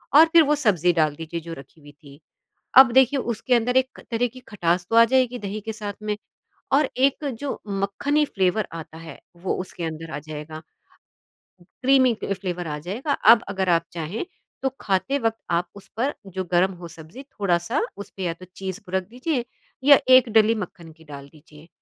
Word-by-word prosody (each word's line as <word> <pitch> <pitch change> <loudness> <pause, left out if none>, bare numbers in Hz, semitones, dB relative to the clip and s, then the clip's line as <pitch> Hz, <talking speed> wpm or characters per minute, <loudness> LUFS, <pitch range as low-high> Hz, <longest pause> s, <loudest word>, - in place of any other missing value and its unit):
और 310 +2 +10
फिर 335 -1 +8
वो 300 0 +2
सब्ज़ी 180 - +2
डाल 155 -3 +1
दीजिए 165 +2 -6
जो 165 +1 -8
रखी 140 +1 -13
हुई 145 - -14
थी। 140 -1 -17 0.6
अब 265 -2 +9
देखिए, 265 +2 +4
उसके 235 +1 -1
अंदर 245 +1 +1
एक 260 0 +1
तरह 235 +2 +2
की 255 +2 -14
खटास 175 -3 0
तो 225 - +2
आ 230 - +9
जाएगी 250 0 +1
दही 205 +1 -5
के 220 - -2
साथ 210 -2 -6
में, 210 0 -2 0.6
और 280 0 +4
एक 275 +3 +2 0.2
जो 285 - -4
मक्खनी 200 +10 0
फ़्लेवर 195 -2 0
आता 160 -1 -9
है, 165 -3 -11 0.2
वो 175 +2 -2
उसके 180 -2 -8
अंदर 160 0 -6
आ - - -5
जाएगा। 155 +1 -7 1.2
क्रीमी 260 -2 +4
क - - -2
अ, - - -1
फ़्लेवर 180 -2 -5
आ 150 0 -4
जाएगा, 245 - -2
अब 230 -3 +6
अगर 190 -2 -2
आप 165 0 0
चाहें 170 +5 -4 0.4
तो 265 - +2
खाते 200 +9 0
वक़्त 225 -3 -1 0.2
आप 175 0 -4
उस - - -22
पर 265 +6 0 0.2
जो 190 - -1
गरम 185 +2 +3
हो 170 - -8
सब्ज़ी, 160 +11 -11
थोड़ा-सा 205 - -1 0.2
उस - - -16
पे 190 - -6
या 175 -2 -1
तो - - -9 0.2
चीज़ 190 +1 -5
रख 190 -1 +1
दीजिए 250 +2 -2 0.4
या 285 0 +8 0.2
1 255 -1 +4
डली 220 +1 +5
मक्खन 170 -2 -15
की 160 - -17
डाल 140 -2 -10
दीजिए। 150 +1 -18
200 Hz, 200 wpm, -23 LUFS, 165-250 Hz, 1.2 s, और